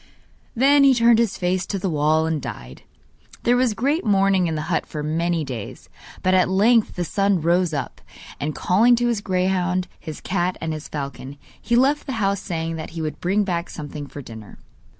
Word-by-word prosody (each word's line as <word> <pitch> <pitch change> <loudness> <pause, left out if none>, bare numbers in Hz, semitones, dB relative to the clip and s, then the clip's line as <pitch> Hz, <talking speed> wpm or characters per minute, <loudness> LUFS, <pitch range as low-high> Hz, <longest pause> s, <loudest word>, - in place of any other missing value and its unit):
Then 275 +4 +5
he 270 -1 +6
turned 230 -1 +5
his 230 -4 0
face 180 0 0
to 200 - -2
the 190 - -2
wall 155 -1 +2
and 160 -2 -1
died. 60 - -8 0.6
There 245 - +3
was 245 -3 +1
great 285 - 0
mourning 195 -3 +3
in 160 - -2
the 155 - -3
hut 160 +1 -1
for 150 -1 -5
many 165 +2 0
days, 125 -7 -7 0.3
but 185 - +2
at 185 -1 +3
length 220 +4 +3
the 180 - -2
son 195 +1 +1
rose 170 +2 +2
up, 140 -4 -5 0.4
and 150 +1 -3
calling 225 +7 +4
to 240 0 0
his 225 -4 -1
greyhound, 185 -1 0
his 155 -2 -8
cat 180 -1 -1
and 160 -1 -3
his 155 0 -7
falcon, 140 -1 -6 0.2
he 235 - 0
left 280 +5 +2
the 265 - -3
house 200 -3 0
saying 165 -3 -4
that 160 - -6
he - - -2
would 155 - -4
bring 195 +4 +1
back 175 -3 -2
something 145 -2 -7
for 145 0 -9
dinner. 110 -3 -11
180 Hz, 200 wpm, -22 LUFS, 155-210 Hz, 0.6 s, he